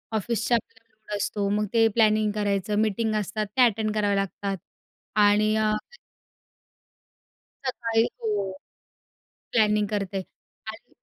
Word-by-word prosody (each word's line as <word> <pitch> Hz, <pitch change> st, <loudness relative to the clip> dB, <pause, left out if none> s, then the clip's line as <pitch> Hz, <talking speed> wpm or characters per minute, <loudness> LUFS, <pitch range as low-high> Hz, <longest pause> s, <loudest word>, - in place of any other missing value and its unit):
ऑफिसच्या 230 Hz, +2 st, +1 dB
प्लॅनिंग 220 Hz, -2 st, -10 dB
असतो. 200 Hz, 0 st, -1 dB
मग 210 Hz, +1 st, +1 dB
ते 225 Hz, -1 st, +5 dB
प्लॅनिंग 215 Hz, -2 st, +3 dB
करायचं. 205 Hz, -1 st, 0 dB
मीटिंग 220 Hz, +1 st, 0 dB
असतात 210 Hz, +1 st, -1 dB
त्या 255 Hz, -, +6 dB
अटेंड 215 Hz, -1 st, 0 dB
करावे 205 Hz, -1 st, +2 dB
लागतात 195 Hz, 0 st, -2 dB, 0.6 s
आणि 210 Hz, +1 st, +4 dB
अ 215 Hz, -1 st, +2 dB, 1.9 s
सकाळी 230 Hz, -3 st, +1 dB, 0.2 s
हो, 225 Hz, -, -2 dB, 1.2 s
प्लॅनिंग 210 Hz, -2 st, +3 dB
करते. 200 Hz, -2 st, -2 dB, 0.5 s
आधी -, -, -16 dB
215 Hz, 110 wpm, -25 LUFS, 205-225 Hz, 1.9 s, त्या